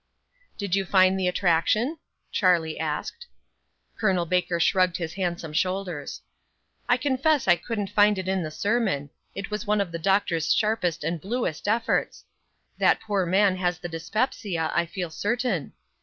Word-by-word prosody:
"Did 200 -4 -4
you 195 0 +2
find 190 0 +4
the 185 - +1
attraction?" 200 - +1 0.3
Charlie 170 -5 +2
asked. 160 - -4 0.7
Col. 190 -5 +2
Baker 180 0 0
shrugged 185 +1 +3
his 170 -2 -4
handsome 175 -4 -3
shoulders. 180 -3 -2 0.7
"I 245 - +5
confess 275 +1 +1
I 175 - +7
couldn't 205 0 -4
find 205 -1 +4
it 190 -1 -4
in 190 0 0
the 155 - -3
sermon. 195 -6 -1 0.2
It 195 +1 -6
was 210 +1 -4
one 210 0 +2
of 195 -4 -1
the 170 - -4
Doctor's 170 -3 +2
sharpest 210 -8 0
and 165 +1 -2
bluest 205 -6 -3
efforts. 225 +2 0 0.5
That - - +4
poor 200 -4 -1
man 190 +1 +3
has 180 -1 0
the 175 -1 -7
dyspepsia, 170 -1 -2
I 170 0 +1
feel 175 -1 -5
certain. 210 - -1
185 Hz, 155 wpm, -25 LUFS, 170-210 Hz, 0.7 s, I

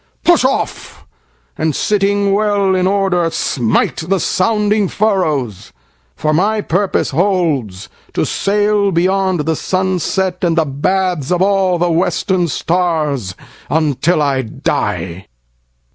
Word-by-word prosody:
Push 345 -5 +4
off, 260 +1 -2 0.5
and 155 -2 0
sitting 200 -1 +1
well 200 -2 +1
in 185 0 +1
order 195 -2 +1
smiteThe 160 - 0
sounding 210 +2 +1
furrows; 155 - -1 0.4
for 155 -1 -1
my 205 +7 +1
purpose 180 -7 0
holdsTo 155 - -1
sail 205 0 +1
beyond 185 0 +1
the 160 +2 -1
sunset, 185 +1 -1
and 170 -2 +1
the 160 - +3
bathsOf 175 +2 -1
all 190 -2 +2
the 175 0 +1
western 175 +1 0
stars, 155 - -1 0.3
until 155 +1 +1
I 135 -2 +1
die. 95 -5 -3
180 Hz, 105 wpm, -16 LUFS, 155-195 Hz, 0.5 s, Push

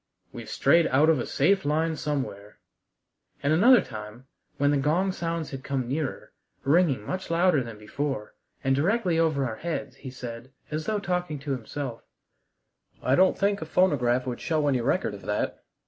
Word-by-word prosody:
"We've - - -8
strayed 165 +5 +4
out 150 +5 +4
of 155 - +1
a - - -3
safe 190 +7 +2
line 160 +2 +1
somewhere." 130 -9 -4 0.9
And 145 +2 +3
another 235 +10 +7
time, 110 +1 -9 0.3
when 145 +1 +3
the 145 - +2
gong 165 +8 +1
sounds 165 -3 -3
had 135 -1 -6
come 135 -3 -2
nearer, 140 +2 -3 0.3
ringing 140 -6 +3
much 185 +9 -4
louder 170 -3 +3
than 115 -3 -7
before, 110 +2 -4 0.3
and 135 0 +2
directly 175 - +1
over 155 -4 +2
our 110 -3 -4
heads, 140 -6 -4
he 135 - -8
said, 125 0 -8 0.2
as 155 +1 -3
though 215 - +1
talking 180 -5 -2
to 140 0 -4
himself: 130 0 -4 1.0
"I 130 - +2
don't 185 +6 +4
think 200 -1 +1
a - - -3
phonograph 130 -9 +2
would 125 -2 -4
show 155 -3 0
any 130 -4 +2
record - - 0
of - - -9
that. - - -2
145 Hz, 175 wpm, -26 LUFS, 130-170 Hz, 1.0 s, another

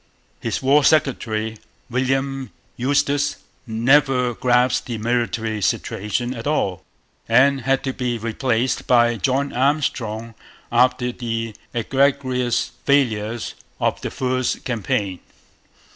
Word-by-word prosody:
His - - -3
war 140 +2 +5
secretary, 110 -7 +1 0.3
William 135 +1 -1 0.3
Eustis, 145 +2 +1 0.3
never 125 +2 +3
grasped 125 +1 +2
the 120 -2 -3
military 115 -1 -1
situation 105 +6 -1
at 115 0 -6
all, 100 - 0 0.5
and 135 +4 +4
had 135 +3 +1
to 130 - -2
be 125 -2 -2
replaced 115 +2 -1
by 120 -2 +4
John 135 +6 0
Armstrong 120 -5 0 0.4
after 125 +1 +3
the 115 -2 -4 0.2
egregious 130 0 +1
failures 120 -5 +1 0.3
of - - 0
the - - -3
first 130 -1 -1
campaign. 100 -5 -2
125 Hz, 105 wpm, -21 LUFS, 115-135 Hz, 0.5 s, war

